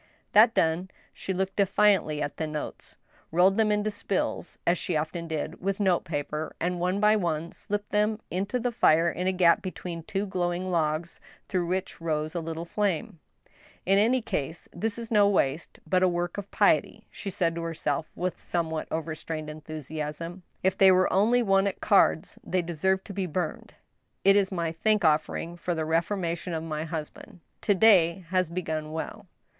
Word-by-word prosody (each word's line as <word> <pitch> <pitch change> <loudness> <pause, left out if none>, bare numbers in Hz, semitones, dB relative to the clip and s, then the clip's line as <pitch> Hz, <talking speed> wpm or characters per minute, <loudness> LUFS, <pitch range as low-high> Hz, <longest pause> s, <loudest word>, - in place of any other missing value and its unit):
That 225 +3 +6
done, 165 +3 +1 0.2
she - - -5
looked 190 +1 -2
defiantly 195 -6 +3
at 145 - -5
the 160 - -2
notes, 150 -1 -6 0.4
rolled 185 +4 +4
them 220 -1 +3
into 210 +1 +1
spills, 205 -2 -2
as 175 +1 +2
she 175 - -2
often 165 +2 -3
did 160 +1 -4
with 195 +1 -1
note 190 -4 +2
paper, 150 -1 -4
and 175 +1 -1
one 180 +3 0
by 210 +1 +5
one 170 -4 -1
slipped 205 0 -4
them 210 +1 +1
into 200 +7 -1
the 245 +1 -1
fire 170 -7 +4
in 180 +1 -3
a - - +3
gap 180 -2 +4
between 180 -2 -6
two 195 +5 -3
glowing 175 -2 -1
log^ 165 -1 -1 0.3
through 180 -3 -1
which 185 -1 -3
rose 155 -1 -1
a 175 - -2
little 165 0 -5
flame. 175 -4 -2 0.3
'' - - -28
In 195 +1 +4
any 240 +3 +3
case, 160 -3 -4
this 215 +5 -2
is 235 -1 -7
no 205 -2 +5
waste^ 155 -4 0
but 185 -1 +2
a 185 - +5
work 175 -1 -1
of 200 - -8
piety," - - +2
she 200 - -6
said 170 -3 0
to 170 - -4
herself, 160 -2 -2
Svith 180 0 -2
somewhat 160 -2 -2
overstrained 155 -1 -4
enthusiasm. 155 +3 -6
" - - -41
If 190 0 +2
they 190 -1 +8
were 185 0 +3
only 230 +5 +4
won 195 -1 +3
at 195 - -3
cards, 200 -6 +3
they 185 -1 0
deserve 190 +3 0
to 200 - -9
be 195 -1 -2
burned. 170 0 -4 0.5
It 195 +1 +6
is 200 -1 +2
my 170 -3 -1
thank 210 +3 +1
offer 155 0 +2
ing 170 +1 -6
for 175 0 -2
the 160 -1 -2
reformation 170 +1 -1
of 160 - -3
my 155 -1 -3
husband. 160 +2 -7 0.2
To 205 - +2
day 185 -4 +5
has 185 -2 +1
begun 160 -3 -3
well." 190 +6 -6
175 Hz, 185 wpm, -27 LUFS, 160-195 Hz, 0.5 s, they